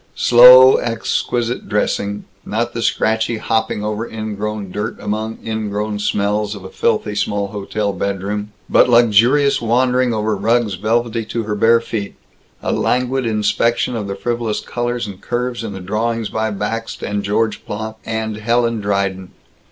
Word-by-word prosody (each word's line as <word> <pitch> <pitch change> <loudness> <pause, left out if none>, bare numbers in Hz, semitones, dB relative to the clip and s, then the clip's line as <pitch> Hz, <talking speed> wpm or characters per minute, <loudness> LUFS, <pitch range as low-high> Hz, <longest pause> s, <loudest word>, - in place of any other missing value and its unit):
Slow 125 +2 +8
exquisite 120 +1 -2
dressing 105 -1 -1 0.2
not 115 +3 -2
the 115 - -3
scratchy 110 0 0
hopping 110 -1 -1
over 105 +2 -3
ingrown 105 -2 -4
dirt, 105 +4 -4
among 110 +2 -3
ingrown 105 -1 -3
smells, 105 +1 -1
of 100 - -10
a 95 - -8
filthy 105 -2 0
small 100 -1 -1
hotel 100 0 -3
bedroom, 100 +2 -3 0.2
but - - +4
luxurious 120 +5 +4
wandering 125 +2 +2
over 110 -1 0
rugs 110 +1 +1
velvety 115 +4 -1
to 115 +1 -3
her 105 0 -3
bare 115 +2 +4
feet. 105 -3 -5 0.5
A - - -1
languid 125 0 0
inspection 115 +3 +1
of 105 -3 -3
the 100 - -4
frivolous 115 +1 -2
colors 120 -1 -3
and 100 -2 -9
curves 120 -1 -3
in 110 - -5
the 95 - -7
drawings 110 +4 -2
by 110 0 -1
Bakst 110 +2 -4
and 100 0 -2
George 105 +2 -1
Plank 110 +1 -6
and 110 -1 -3
Helen 115 +1 +1
Dryden. 100 -2 -1
110 Hz, 150 wpm, -18 LUFS, 105-115 Hz, 0.5 s, Slow